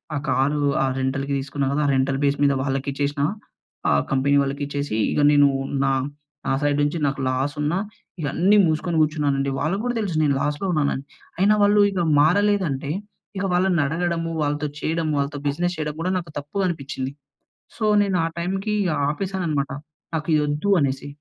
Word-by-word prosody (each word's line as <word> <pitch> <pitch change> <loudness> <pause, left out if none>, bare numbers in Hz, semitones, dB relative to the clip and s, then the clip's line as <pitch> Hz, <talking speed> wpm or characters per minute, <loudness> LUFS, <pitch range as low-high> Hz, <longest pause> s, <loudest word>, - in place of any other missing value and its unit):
ఆ - - 0
కారు 145 +3 +1 0.2
ఆ - - +2
రెంటల్‌కి 135 +1 -1
తీసుకున్నా 135 0 -2
కదా! 150 +2 0
ఆ - - +2
రెంటల్ 135 +1 +1
బేస్ 140 0 +2
మీద 140 - +4
వాళ్ళకిచ్చేసిన 140 +1 -2 0.7
ఆహ్, 70 0 +3
కంపెనీ 140 +2 +2
వాళ్ళకి 140 +1 -2
ఇచ్చేసి 140 -4 -3 0.2
ఇగ 150 - +1
నేను 145 -1 +6 0.4
నా, 135 - +2 0.6
నా - - +1
సైడ్ 145 0 +1
నుంచి 145 +3 0
నాకు 140 0 -2
లాసున్నా, 145 +5 -1 0.4
ఇగ 155 - -3
అన్నీ 195 +5 +4
మూసుకొని 160 +1 0
కూర్చున్నానండి. 145 -3 +1
వాళ్ళకి 195 +6 -1
కూడా 245 -1 -1
తెలుసు 195 -6 -2
నేను 140 -2 +2
లాస్‌లో 150 +5 -1
ఉన్నానని. 140 -3 0 0.4
అయినా 205 +3 +5
వాళ్ళు 205 0 +5
ఇగ 185 -3 -1 0.2
మారలేదంటే, 175 -5 +2 0.5
ఇక 195 - -1
వాళ్ళనడగడము, 170 -1 +1
వాళ్ళతో 145 +1 -1
చేయడము 160 0 -1
వాళ్ళతో 140 +1 -2
బిజినెస్ 175 +5 -1
చేయడం 150 -1 -3
కూడా 185 +2 0
నాకు 170 -4 -6
తప్పు 145 +7 -8
అనిపించింది. 140 -5 -4 0.7
సో, 220 - -1 0.2
నేను 195 -2 0
ఆ - - 0
టైమ్‌కి 195 +4 -1 0.3
ఆపేశాననమాట. 165 -4 -2 0.4
నాకిది 155 -1 +1
వద్దు 150 +7 -1
అనేసి. 135 0 -1
150 Hz, 160 wpm, -23 LUFS, 140-175 Hz, 0.7 s, నేను